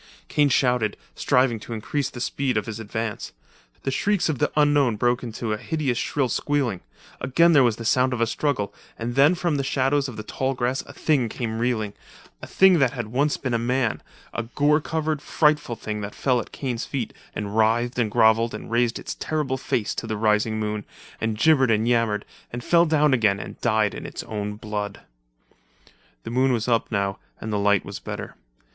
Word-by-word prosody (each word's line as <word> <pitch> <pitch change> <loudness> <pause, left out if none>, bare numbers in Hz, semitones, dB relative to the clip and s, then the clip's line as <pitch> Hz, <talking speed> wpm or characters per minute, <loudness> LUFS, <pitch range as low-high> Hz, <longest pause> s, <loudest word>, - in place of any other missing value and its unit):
Kane 145 -1 +3
shouted, 125 -4 +2 0.2
striving 125 -3 +2
to 115 - -8
increase 130 +5 -2
the 120 - -9
speed 130 -1 -1
of 105 - -1
his 115 -1 -6
advance. 110 0 -4 0.5
The 135 - -1
shrieks 200 +5 +1
of 150 - -1
the 150 - +1
unknown 145 -5 +3
broke 120 +3 +1
into 115 -2 -3
a - - -2
hideous 140 -2 -1
shrill 140 -3 0
squealing; 125 -5 -1 0.4
again 165 +7 +4
there 145 - +7
was 120 -3 +3
the 115 - -8
sound 130 +3 +3
of 125 - -2
a 115 - +3
struggle, 115 -3 -1 0.2
and 115 +1 -3
then 140 +7 +5
from 170 -4 0
the 140 - -1
shadows 135 +1 +1
of 120 - -9
the 110 - -5
tall 130 +4 -2
grass 125 +2 0
a - - -9
thing 135 -7 +1
came 110 -1 -3
reeling 115 -4 -1 0.3
— - - -25
a - - -8
thing 190 -3 +5
that 135 -3 +3
had 120 -4 -4
once 140 +5 +1
been 130 -3 -3
a 115 - +2
man—a 120 -1 -2
gore 150 +1 +3
covered, 155 -1 -2
frightful 150 -6 +1
thing 105 -1 -5
that 100 0 -6
fell 130 -3 +1
at - - -7
Kane's 125 -4 -3
feet 130 -5 -4 0.2
and 105 0 -4
writhed 115 +3 +2
and 115 -3 +2
grovelled 110 +2 +3
and - - -8
raised 120 0 +2
its - - -5
terrible 150 -4 -1
face 115 -4 -1
to - - -5
the 110 - -2
rising 110 0 +1
moon, 105 -1 -2 0.4
and 110 -1 -1
gibbered 135 0 +4
and 110 0 +2
yammered, 115 -3 +1 0.3
and 120 0 -5
fell 170 +4 +4
down 150 -2 +3
again 105 -6 +3
and - - -9
died 110 -2 +2
in - - -6
its - - -6
own 105 -1 -4
blood. 105 -1 -5 1.2
The - - -6
moon 130 +2 +3
was 115 -1 -1
up 115 -1 +1
now 100 -2 -1 0.2
and 110 -1 -4
the 105 - +1
light 100 -1 +3
was - - -7
better. - - -6
120 Hz, 200 wpm, -24 LUFS, 110-140 Hz, 1.2 s, there